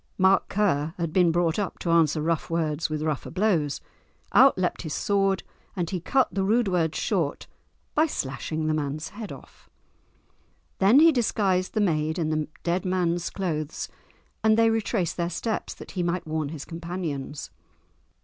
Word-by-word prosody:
Mark 190 0 +4
Ker 165 -6 +1
had 165 -3 -2
been 180 -2 +4
brought 170 +1 +1
up 200 - -3
to 170 - -2
answer 160 -2 +3
rough 165 0 -1
words 160 -2 -1
with 155 0 -2
rougher 155 -3 -2
blows; 180 -8 0 0.5
out 270 -5 +7
leapt 180 -1 -1
his 155 -4 -4
sword, 195 -2 +1 0.3
and 175 -3 -2
he 185 - -1
cut 260 +6 +1
the 195 - 0
rude 225 +3 +2
words 165 -4 0
short 170 -9 -1 0.5
by 310 +2 +3
slashing 155 - -3
the 155 - +1
man's 155 +1 -2
head 210 +1 -8
off. - - -13 1.1
Then 215 +9 +6
he 330 +1 +8
disguised 200 -8 0
the 215 - +2
maid 160 -3 +1
in 160 -3 0
the 155 -1 -1 0.2
dead 175 +1 0
man's 175 -2 0
clothes, 160 -5 -3 0.5
and 220 0 +4
they 225 0 +5
retraced 210 -6 -1
their 170 -1 0
steps 215 +6 -3
that - - -11
he 185 - -2
might 175 0 -1
warn 155 -2 -2
his 150 -2 -7
companions. 165 -5 -5
175 Hz, 170 wpm, -26 LUFS, 155-195 Hz, 1.1 s, he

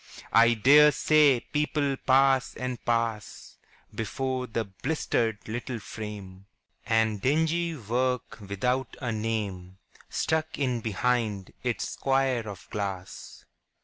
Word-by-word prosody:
I 115 +1 +6
dare 145 +7 +7
say 150 -3 +4
people 150 -2 -1
pass 135 0 +3
and 125 -2 -5
pass 115 -3 -2 0.4
Before 130 +2 -3
the 115 0 -2
blistered 110 +1 -1
little 120 +2 -4
frame, 100 -3 -8 0.4
And 110 -2 +1
dingy 160 +5 +1
work 125 +1 -2
without 115 +6 -2
a 125 -4 -2
name 105 -5 -3 0.3
Stuck 160 0 -1
in 125 -4 0
behind 110 -2 -1
its 125 -2 -2
square 135 -4 0
of 100 -2 -9
glass. 95 -3 -6
120 Hz, 110 wpm, -27 LUFS, 105-135 Hz, 0.4 s, dare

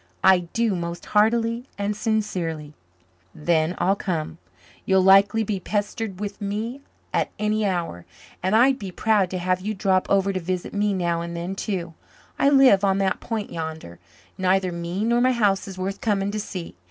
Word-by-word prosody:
"I 190 -1 +7
do, 230 -2 +1
most 170 0 -5
heartily 230 +3 +2
and 205 +1 -1
sincerely." 185 -9 -2 0.6
"Then 160 +2 +1
I'll 195 +2 +2
come. 170 -4 -3 0.4
You'll 190 -1 +3
likely 195 +4 +5
be 200 -2 -2
pestered 205 0 -3
with 205 0 -5
me 220 +6 -3 0.3
at - - +1
any 215 0 0
hour. 170 - -3 0.3
And 190 +4 +1
I'd 260 +4 +4
be 195 - -5
proud 205 -1 +2
to 185 - -3
have 185 +1 0
you 215 +3 -3
drop 190 -1 +1
over 195 0 +2
to 185 - -1
visit 180 +1 -4
me 205 0 +1
now 170 -2 0
and 170 0 -5
then 175 +3 -4
too. 185 -4 -4 0.5
I 280 - +5
live 265 -8 +6
on 195 -1 +3
that 195 -1 0
point 220 -3 -4
yander. 160 - -6 0.4
Neither 185 0 +2
me 170 +3 -3
nor 235 +1 +2
my 255 +1 +4
house 205 -5 +1
is 190 -1 -8
worth 190 +2 -4
coming 200 -2 0
to 215 - -3
see. 185 -4 -6
195 Hz, 175 wpm, -24 LUFS, 180-215 Hz, 0.6 s, I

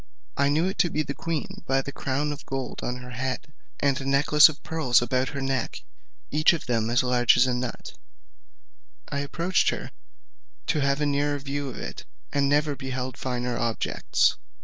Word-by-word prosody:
I 140 0 +2
knew 155 +4 +2
it 190 +2 -3
to 175 - +4
be 155 -1 0
the 140 - -4
queen, 165 0 -4
by 135 0 +2
the 140 - -5
crown 140 +2 -2
of 145 0 -7
gold 135 -1 -4
on 125 - -2
her 125 - -9
head, 130 +3 -4 0.3
and 140 -1 +1
a - - -5
necklace 140 +3 +6
of 155 - -9
pearls 155 -7 +3
about 125 +2 0
her 140 - -5
neck, 135 -2 -2 0.5
each 155 +3 +5
of 165 - -4
them 115 -3 0
as 120 +2 +3
large 125 -2 +4
as 125 - +6
a 130 - +1
nut; 125 -1 -4 1.2
I 140 - -2
approached 165 +6 +1
her - - -4 0.7
to 155 - +1
have 140 +1 +1
a - - +2
nearer 145 0 +1
view 140 0 -4
of - - -8
it, - - -7 0.3
and 140 -1 +2
never 145 0 +2
beheld 130 -1 -4
a - - -18
finer 125 -1 -2
objets. 115 -1 +1
140 Hz, 195 wpm, -26 LUFS, 125-145 Hz, 1.2 s, necklace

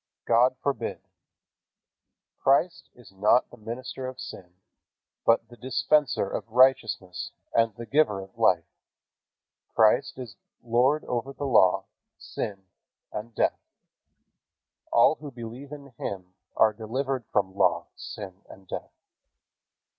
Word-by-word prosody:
God 120 +2 +4
forbid. 140 -1 -2 1.4
Christ 155 +6 +2
is 120 -5 -16
not 105 +6 +3
the - - -13
minister 130 +4 -6
of 130 - -8
sin, 90 -1 -9 0.7
but 115 0 +4
the 120 - -13
Dispenser 130 -1 +1
of - - -3
righteousness 110 -7 +2 0.2
and 115 -2 +2
the 115 - -7
Giver 135 -6 +2
of 95 0 -11
life. 95 -8 +3 1.1
Christ 110 +2 +4
is 120 -6 -8 0.3
Lord 125 +6 +2
over 125 +3 -3
law, 130 -10 +4 0.3
sin 100 -2 -5 0.5
and 110 +2 -6
death. - - +1 1.3
All 120 +6 +5
who 150 - -7
believe 120 +3 -9
in 140 -3 -10
Him 90 -2 -5 0.2
are 110 -1 +5
delivered 130 +4 -2
from 95 -2 +1
law, 85 -3 +2
sin 95 -2 -8
and 95 -1 -14
death. - - -6
115 Hz, 115 wpm, -27 LUFS, 100-130 Hz, 1.4 s, All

